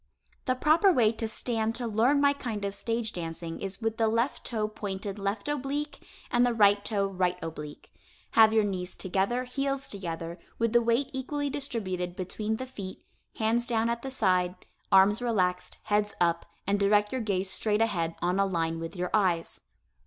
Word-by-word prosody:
The 255 - +1
proper 315 +9 +4
way 235 -9 +4
to 225 0 -3
stand 225 0 -1
to 245 - -1
learn 235 +6 +3
my 285 0 +4
kind 225 -7 -4
of 200 - -2
stage 225 +2 -2
dancing 165 -1 -5
is 195 +3 -5
with 225 0 -1
the 225 - +3
left 230 +5 0
toe 215 -3 -1
pointed 205 -1 -5
left 200 +3 -2
oblique, 295 +1 -3 0.3
and 240 0 +4
the 245 -1 +2
right 205 -2 +5
toe 205 -2 0
right 180 -2 0
oblique. 150 -2 -8 0.4
Have 220 -1 +7
your 220 -1 +4
knees 185 -3 -3
together, 200 +6 0
heels 275 +2 -2
together, 170 -3 -5 0.2
with 230 -1 0
the 240 - +6
weight 235 +4 +1
equally 285 +2 -2
distributed 195 -11 -3
between 210 +4 -2
the 255 - -5
feet, 200 -7 -8 0.3
hands 230 +2 +1
down 230 -1 +1
at 235 0 -3
the 270 - -5
side, 185 -7 +1 0.4
arms 195 +4 +6
relaxed, 185 -7 0
heads 210 0 0
up 170 -1 +1 0.2
and 200 +1 +1
direct 210 +1 +3
your 260 - -1
gaze 195 -3 -1
straight 210 -1 0
ahead 170 -7 0
on 180 +2 +1
a 195 - +4
line 165 -3 -1
with 165 +3 -6
your 180 0 -3
eyes. 180 -6 +1
215 Hz, 180 wpm, -28 LUFS, 185-240 Hz, 0.4 s, Have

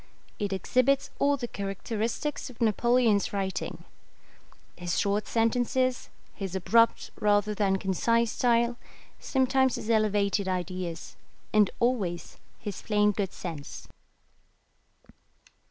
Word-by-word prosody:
It 205 -1 -2
exhibits 255 +8 +1
all 285 0 +3
the 245 -2 -4
characteristics 225 +8 -3
of 245 - -14
Napoleon's 230 -1 +2
writing: 195 -1 -3 0.9
his 175 0 -3
short 205 +1 0
sentences, 245 +2 +1 0.2
his 195 -2 -5
abrupt 230 +5 +3
rather 210 0 +2
than 195 -2 +1
concise 230 +5 +1
style, 235 0 +2 0.4
sometimes 265 -1 +2
his 225 - -3
elevated 205 -2 +2
ideas, 180 -2 -4 0.4
and 210 -2 +5
always 205 -9 -1 0.2
his 205 -3 -6
plain 210 -1 +2
good 200 -2 -2
sense. 155 -5 -7
210 Hz, 105 wpm, -28 LUFS, 195-240 Hz, 0.9 s, and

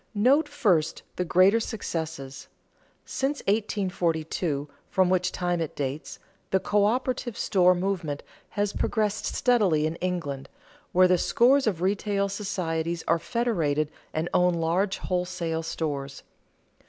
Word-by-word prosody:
_ - - -38
Note 265 +10 +4
first 165 -8 +1
the 180 - 0
greater 185 +5 +4
successes. 160 - -5 0.6
Since 275 +2 -2
1842, 175 -7 -1 0.2
from 185 -1 +2
which 185 0 +2
time 175 -1 -1
it 160 - -4
dates, 140 +1 -4 0.3
the 190 - +2
coöperative 235 +4 0
store 180 -1 +3
movement 175 -6 -2 0.3
has 205 0 +1
progressed 215 -2 0
steadily 200 -12 +2
in 160 +1 -2
England, 165 -7 -3 0.4
where 185 +1 +6
the 180 -1 +3
scores 265 +2 +4
of 180 -5 0
retail 200 +1 0
societies 170 -4 -2
are 165 +1 +3
federated 165 -10 0 0.2
and 160 +2 -2
own 180 0 +3
large 175 +4 0
wholesale 180 -3 -2
stores. 145 -4 -4
180 Hz, 125 wpm, -26 LUFS, 160-205 Hz, 0.6 s, where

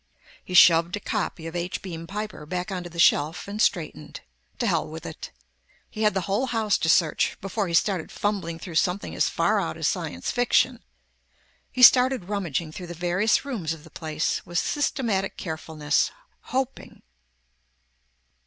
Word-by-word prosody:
He 185 - -5
shoved 170 0 +6
a - - -4
copy 165 -4 -3
of 165 +1 -6
H. 175 +1 -3
Beam 165 -3 -7
Piper 210 -5 -6
back 180 +3 -3
onto 180 -2 -4
the 170 - -12
shelf 160 +1 +3
and 205 +2 -3
straightened. 155 - -1 0.4
To - - -1
hell - - +1
with - - -9
it. - - -7 0.6
He 215 - -6
had 210 -2 +3
the 190 - +1
whole 205 +8 -1
house 220 -4 +1
to 160 - 0
search, 160 -2 +2
before 195 +1 -2
he 170 - -1
started 185 -2 +1
fumbling 195 -6 -2
through 170 +1 -9
something 185 +1 -3
as - - +1
far - - +1
out - - -3
as - - 0
science - - -2
fiction. 245 0 +2 0.9
He 255 - 0
started 250 -6 +6
rummaging 170 -6 -2
through 175 +2 -8
the 175 - -7
various 180 - +1
rooms 200 - -3
of 160 -2 -11
the 160 - -15
place 155 0 -2
with 175 - -5
systematic 230 -7 0
carefulness. 155 -3 -1 0.4
Hoping... 265 0 -4
180 Hz, 165 wpm, -25 LUFS, 165-210 Hz, 0.9 s, shoved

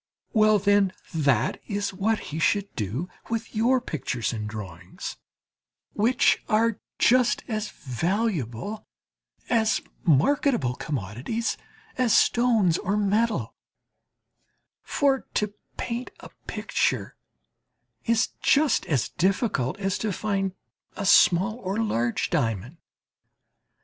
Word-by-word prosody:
Well, 215 -1 +5
then, 200 -1 +3 0.2
that 140 -7 +1
is 200 -1 -2
what 210 +3 0
he 160 - -2
should 200 +4 +1
do 115 - -3 0.2
with 230 -1 -3
your 245 +4 +3
pictures 135 - -3
and 105 -2 -4
drawings, 95 -5 -7 0.8
which 245 +6 +3
are 225 0 +2 0.2
just 250 0 +3
as 215 -2 -2
valuable 165 - -2 0.6
as 225 -2 +2 0.2
marketable 190 - +3
commodities 135 - -3 0.4
as 245 -4 +4
stones 225 -8 +3
or 200 +3 -1
metal; 210 +2 +1 1.3
for 275 -3 +1
to 210 -1 0 0.2
paint 240 +1 -3
a - - -11 0.2
picture - - -1 0.9
is 230 0 +2
just 295 0 +3
as 140 -8 0
difficult 190 - 0
as 195 0 -1
to 215 - -1
find 195 -1 -1 0.4
a 200 - -4
small 190 +4 +5
or 195 -3 -3
large 120 - 0
diamond. 115 - -1
200 Hz, 105 wpm, -26 LUFS, 140-225 Hz, 1.3 s, Well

